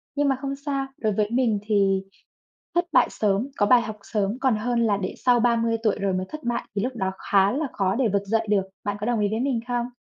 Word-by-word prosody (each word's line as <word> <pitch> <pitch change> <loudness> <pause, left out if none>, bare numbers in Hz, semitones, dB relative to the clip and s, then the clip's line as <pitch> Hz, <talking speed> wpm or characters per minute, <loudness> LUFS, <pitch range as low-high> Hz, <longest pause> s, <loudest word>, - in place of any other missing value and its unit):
Nhưng 290 0 +2
mà 270 - +2
không 275 -1 -3
sao, 275 -1 -3
đối 215 -2 0
với 210 +1 0
mình 235 -4 +2
thì 195 -2 +2 0.7
thất 345 0 +3
bại - - +5
sớm, 210 +4 0
có 205 - +2
bài 240 +2 +6
học 215 -2 -6
sớm, 210 +1 -2
còn 260 -4 +2
hơn 235 +2 0
là 205 -2 +2
để 185 -2 -4
sau 245 -1 +5
30 230 -1 +2
tuổi 215 -3 +2
rồi 195 -1 0
mới 185 0 -2
thất 310 -1 -8
bại 240 0 -1
thì 200 - +1
lúc 250 +1 -3
đó 190 -2 -1
khá 195 0 +3
là 295 +4 -1
khó 190 -1 0
để 250 -1 +1
vực 200 0 0
dậy 225 +2 0
được. 200 -2 +3 0.2
Bạn 205 0 -2
có 210 - -3
đồng 240 -2 +1
ý 205 - +2
với 220 +2 -1
mình 255 -3 0
không? 245 -1 0
225 Hz, 260 wpm, -24 LUFS, 205-250 Hz, 0.7 s, bài